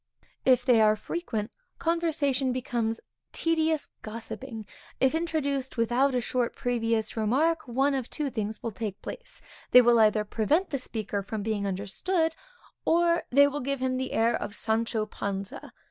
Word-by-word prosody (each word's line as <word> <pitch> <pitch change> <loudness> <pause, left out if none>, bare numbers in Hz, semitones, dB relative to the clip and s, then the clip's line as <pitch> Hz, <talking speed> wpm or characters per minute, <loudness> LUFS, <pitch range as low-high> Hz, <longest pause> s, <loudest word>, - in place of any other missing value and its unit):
If 255 -1 +4
they 235 -3 +5
are 215 0 +5
frequent, 220 -3 -4 0.3
conversation 300 -6 +1
becomes 240 -3 -1
a - - -12 0.3
tedious 320 -2 +1
gossipping; 225 +1 -7 0.3
if 265 +1 +3
introduced 285 -6 -1
without 245 +4 +2
a 250 - +2
short 245 0 -1
previous 230 -3 -1
remark, 275 +9 +1
one 270 +4 +2
of 260 -3 -2
two 295 -3 -3
things 215 -2 -4
will 230 - -2
take 205 -2 -5
place, - - -7 0.3
they 250 - +9
will 235 -1 +5
either 215 -1 +4
prevent 290 - +1
the 275 - 0
speaker 215 -5 -3
from 205 +1 -5
being 210 -2 -1
understood, 320 - -1 0.5
or 340 0 +3
they 280 +3 +6
will 285 +1 -1
give 275 +1 -2
him 255 0 0
the 260 0 -3
air 230 +1 +3
of 205 - -4
Sancho 220 0 0
Panza. 200 -2 -5
245 Hz, 160 wpm, -28 LUFS, 220-285 Hz, 0.5 s, they